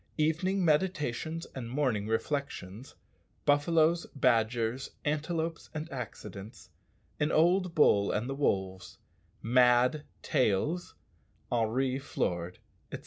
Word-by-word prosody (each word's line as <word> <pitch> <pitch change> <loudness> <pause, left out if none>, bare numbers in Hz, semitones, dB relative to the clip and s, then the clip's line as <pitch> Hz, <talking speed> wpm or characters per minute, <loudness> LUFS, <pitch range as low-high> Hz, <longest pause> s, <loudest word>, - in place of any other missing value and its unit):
_Evening 170 +5 +1
meditations 160 -2 0
and 120 -3 -6
morning 125 -6 0
reflections 110 -2 -3 0.5
Buffaloes, 160 +3 +3
badgers, 120 -1 +1 0.2
antelopes, 160 +2 -2
and 155 +1 -4
accidents 105 -6 -8 0.5
An 150 +1 +1
old 175 +2 +3
bull 100 -9 +4
and 110 +4 -1
the 135 - -2
wolves 95 -9 -2 0.5
"Mad 125 +4 +4 0.2
tails" 130 - 0 0.6
Henri 125 +3 0
floored, 90 -9 -3 0.3
etc. - - -5
135 Hz, 95 wpm, -30 LUFS, 115-155 Hz, 0.6 s, bull